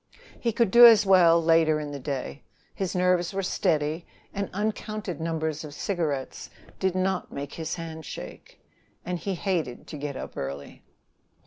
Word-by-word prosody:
He 235 - 0
could 225 -2 +1
do 240 0 +10
as 215 -3 +6
well 175 -3 +6
later 165 -1 +3
in 150 -1 -5
the 140 - -6
day, 140 0 -5 0.3
his 190 -1 -3
nerves 180 0 +1
were 195 - -1
steady, 155 -1 0 0.3
and 200 0 -3
uncounted 210 -3 -3
numbers 160 -2 -2
of 150 -2 -9
cigarettes 155 -8 -3 0.3
did 190 -1 0
not 185 0 -1
make 140 0 -6
his 160 -1 -4
hand 160 -2 -7
shake, - - -10 0.5
and 180 -1 -3
he 195 +1 -3
hated 170 -10 -2
to 155 - -8
get 140 -2 -4
up - - -7
early. 70 +1 -6
165 Hz, 160 wpm, -26 LUFS, 150-190 Hz, 0.5 s, do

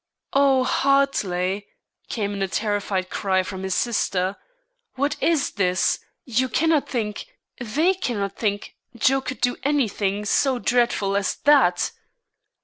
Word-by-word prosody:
"O 275 -2 +4
Hartley!" 205 -9 +1 0.4
came 205 -3 -2
in 200 - -4
a 195 - +1
terrified 200 -2 -2
cry 190 -2 +1
from 190 0 -6
his 190 -1 -2
sister; 195 -5 0 0.6
"what 280 +3 0
is 320 -4 +2
this? 185 -3 +1 0.3
You 255 +1 0
cannot 320 +4 +1
think, 215 -4 -3 0.3
they 300 - +1
cannot 215 - -3
think, 205 -2 -2 0.2
Joe 270 +4 +2
could 260 0 -6
do 245 - +1
any 280 -2 +2
thing 200 0 -2
so 260 +4 +2
dreadful 235 -5 +1
as 200 -1 0
that?" 270 -12 +4
220 Hz, 135 wpm, -23 LUFS, 195-270 Hz, 0.6 s, O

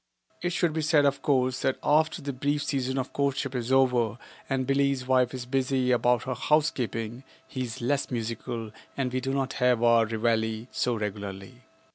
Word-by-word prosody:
It 175 - 0
should 170 -2 +1
be 160 - -1
said, 150 -1 +3
of 140 -1 +1
course, 130 -2 +1
that 130 - +1
after 155 +1 +2
the 140 0 -3
brief 145 +3 -1
season 130 -1 -1
of 130 -1 -3
courtship 140 -1 -1
is 125 -1 -3
over 125 -4 +3 0.3
and 135 -1 0
Billie's 135 -1 +1
wife 130 -1 +3
is 130 -2 -6
busy 130 0 +1
about 120 -1 +3
her 130 - -2
housekeeping, 125 -4 0 0.2
he 130 - -5
is 120 -2 -5
less 140 +4 0
musical 115 -1 -4 0.3
and 130 -2 -1
we 130 - +1
do 135 - -2
not 135 0 -1
have 125 -2 +3
our 115 -1 +5
reveille 110 0 0
so 125 -1 0
regularly. 105 +2 -6
130 Hz, 180 wpm, -27 LUFS, 120-140 Hz, 0.3 s, our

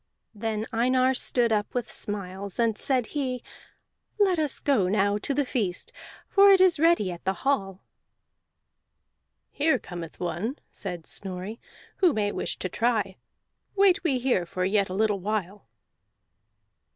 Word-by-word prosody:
Then 220 0 -3
Einar 255 +3 +3
stood 245 -2 +2
up 210 +1 -1
with 245 -2 -1
smiles, 200 -2 -4
and 230 -2 +2
said 255 +1 +2
he, 255 -4 -2 0.8
"Let 380 -4 +3
us 300 -3 +1
now 280 -5 +3 0.3
go 205 - -1
to 280 - -3
the 290 0 +1
feast, 205 -9 -2 0.3
for 400 0 +6
it 385 - +6
is 370 -4 +4
ready 325 - +3
at 175 - -9
the 190 - 0
hall." 195 -9 0 1.7
"Here 310 +2 +2
cometh 175 -2 -9
one," 190 - -3
said 180 -5 -6
Snorri, 190 +3 -5 0.4
"who 360 -5 +4
may 205 -3 0
wish - - -3
to - - -3
try; 215 -1 0 0.6
wait 390 -2 +4
we 290 -7 +1
here 245 -9 0
for 180 +1 -2
yet 200 0 +1
a 185 - -4
little 210 -1 +1
while." 200 - -3
220 Hz, 145 wpm, -26 LUFS, 195-270 Hz, 1.7 s, for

